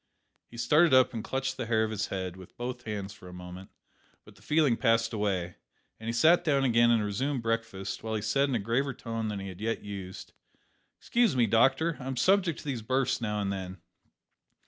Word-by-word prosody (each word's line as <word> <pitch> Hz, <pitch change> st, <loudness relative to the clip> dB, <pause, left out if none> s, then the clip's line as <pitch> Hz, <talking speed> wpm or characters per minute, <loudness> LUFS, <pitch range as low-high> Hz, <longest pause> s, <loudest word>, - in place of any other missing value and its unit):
He 120 Hz, -, -12 dB
started 150 Hz, +5 st, +4 dB
up 130 Hz, 0 st, +5 dB
and 110 Hz, -2 st, -4 dB
clutched 135 Hz, +1 st, -2 dB
the 115 Hz, -, -4 dB
hair 110 Hz, -1 st, +2 dB
of 110 Hz, -, -2 dB
his 105 Hz, -2 st, -2 dB
head 95 Hz, -2 st, -4 dB
with 95 Hz, -1 st, -14 dB
both 120 Hz, 0 st, -5 dB
hands 105 Hz, -2 st, -4 dB
for 90 Hz, -, -14 dB
a 90 Hz, -, -10 dB
moment; 90 Hz, +1 st, -9 dB, 0.6 s
but -, -, -15 dB
the -, -, -22 dB
feeling 150 Hz, -5 st, +2 dB
passed 115 Hz, 0 st, +2 dB
away, 95 Hz, -5 st, -2 dB, 0.4 s
and 110 Hz, +1 st, -5 dB
he -, -, +1 dB
sat 165 Hz, +9 st, +4 dB
down 140 Hz, -5 st, +2 dB
again 120 Hz, -2 st, +4 dB
and 115 Hz, -3 st, +3 dB
resumed 130 Hz, +5 st, -2 dB
breakfast, 115 Hz, -4 st, -3 dB
while 110 Hz, 0 st, -3 dB
he 105 Hz, -, -2 dB
said 135 Hz, +6 st, +1 dB
in 130 Hz, -, 0 dB
a -, -, +1 dB
graver 120 Hz, +6 st, -1 dB
tone 115 Hz, -2 st, -4 dB
than 105 Hz, -2 st, -3 dB
he 95 Hz, 0 st, -6 dB
had 95 Hz, +1 st, -10 dB
yet 115 Hz, +1 st, -2 dB
used 95 Hz, -2 st, -8 dB, 0.6 s
"Excuse 235 Hz, -, +1 dB
me, 120 Hz, -2 st, +4 dB
doctor; 135 Hz, +9 st, +3 dB
I'm 130 Hz, 0 st, -5 dB
subject 185 Hz, +2 st, +3 dB
to -, -, -16 dB
these 130 Hz, -5 st, -3 dB
bursts 130 Hz, +3 st, 0 dB
now 105 Hz, -2 st, -1 dB
and 100 Hz, 0 st, -1 dB
then. 95 Hz, -1 st, -6 dB
115 Hz, 215 wpm, -29 LUFS, 100-130 Hz, 0.6 s, up